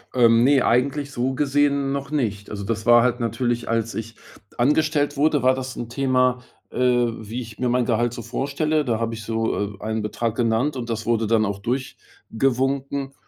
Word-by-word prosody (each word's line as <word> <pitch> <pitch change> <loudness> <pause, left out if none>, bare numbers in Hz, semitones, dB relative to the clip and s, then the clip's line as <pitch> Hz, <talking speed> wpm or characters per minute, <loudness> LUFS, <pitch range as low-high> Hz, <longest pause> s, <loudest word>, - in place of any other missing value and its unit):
Ähm, 115 -1 +5
ne, 135 0 +4
eigentlich 140 +4 +1
so 130 0 -1
gesehen 140 0 +1
noch 140 +1 -4
nicht. 105 -8 -2
Also, 100 -1 -5
das 110 +1 -3
war 120 0 +7
halt 125 0 +1
natürlich, 120 +1 -1
als 115 0 -1
ich 115 0 -6 0.4
angestellt 145 +2 +1
wurde, 150 -1 +2
war 130 +1 +4
das 130 -1 -5
'n 120 -1 -6
Thema, 130 -1 +1 0.3
äh, - - -8
wie 120 -2 0
ich 115 -2 -10
mir 125 - -1
mein 125 0 +1
Gehalt 120 0 +1
so 120 - -6
vorstelle. 140 +5 -1
Da 115 -2 0
habe 115 0 -2
ich 110 - -8
so, 110 -2 -2
äh, - - -18
einen 110 0 -2
Betrag 115 +1 -2
genannt. 120 +4 +1
Und 120 -1 -5
das 115 -1 -3
wurde 115 -1 +1
dann 110 0 +2
auch 100 -1 -3
durchgewunken. 135 +3 -2
120 Hz, 190 wpm, -23 LUFS, 115-135 Hz, 0.4 s, war